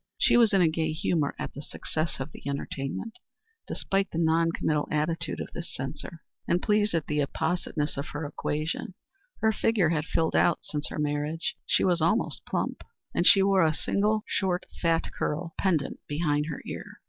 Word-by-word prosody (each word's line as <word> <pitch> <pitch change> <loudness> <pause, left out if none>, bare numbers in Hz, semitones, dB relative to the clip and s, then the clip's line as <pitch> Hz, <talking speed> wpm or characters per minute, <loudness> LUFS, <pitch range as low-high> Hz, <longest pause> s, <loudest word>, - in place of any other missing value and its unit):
She - - +4
was 235 -3 +6
in 195 -2 +4
a - - +5
gay 160 0 0
humor 155 -2 0
at - - -5
the 140 - -7
success 155 +2 -3
of 135 +3 -4
the - - -12
entertainment, 140 - -4 0.5
despite 195 0 0
the - - -5
non 165 0 +3
committal 150 -2 0
attitude 155 +2 -1
of - - -5
this 170 0 -6
censor, 150 +4 -6 0.2
and 175 - +3
pleased 210 -1 +2
at 160 - 0
the 150 0 -1
appositeness 160 0 -1
of 140 - -3
her 145 0 -5
quotation. 155 +4 -2 0.5
Her 220 - +4
figure 215 -5 +2
had 155 -2 0
filled 160 0 0
out 175 - +3
since 150 -1 -3
her - - -6
marriage. 150 +2 -1
She - - +3
was 175 -3 +3
almost 170 +9 +1
plump - - -2 0.3
and 175 - +2
she 195 - +8
wore 195 -2 +4
a 155 -1 +3
single 210 +4 +1
short 185 -2 0 0.2
fat 165 -1 +1
curl 165 +2 -2
pendent 165 -8 +1
behind 150 -1 0
her 150 - -5
ear. - - -7
165 Hz, 185 wpm, -28 LUFS, 150-180 Hz, 0.5 s, she